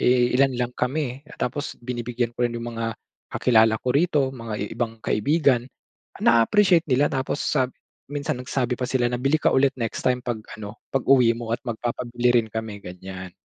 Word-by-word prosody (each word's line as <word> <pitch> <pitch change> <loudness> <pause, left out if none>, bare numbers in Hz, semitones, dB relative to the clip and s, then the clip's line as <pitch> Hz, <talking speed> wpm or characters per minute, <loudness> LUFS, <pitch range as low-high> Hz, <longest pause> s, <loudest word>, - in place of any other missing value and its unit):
Eh, 125 0 +3
ilan 135 +1 +4
lang 125 0 -1
kami 135 0 -2
tapos 145 +4 -3
binibigyan 120 -1 -2
ko - - -10
rin 120 - -5
'yong 115 0 -5
mga 115 0 -3 0.4
kakilala 110 -2 +3
ko 125 - 0
rito, 145 -1 +2
mga 115 -4 -6
i - - -1
ibang 115 -2 -3
kaibigan. 135 0 +2 0.6
Na-aappreciate 170 - +4
nila, 140 +2 +3
tapos 135 +1 -2
sab 130 -3 0 0.3
minsan 145 -1 -3
nagsabi 125 -1 -2
pa 125 - -1
sila 125 -2 +1
na, 125 - -2
"Bili 135 +4 +1
ka - - +4
ulit 135 +1 +3
next 115 -1 -4
time 125 -1 +2
‘pag 120 -3 -2 0.2
ano, 105 0 -8 0.2
pag-uwi 125 -3 +4
mo 115 -1 -6
at 115 - 0
magpapabili 120 +1 0
rin - - -9
kami.” 110 -2 -4
Ganiyan. 95 -1 -9
125 Hz, 180 wpm, -24 LUFS, 115-135 Hz, 0.6 s, ilan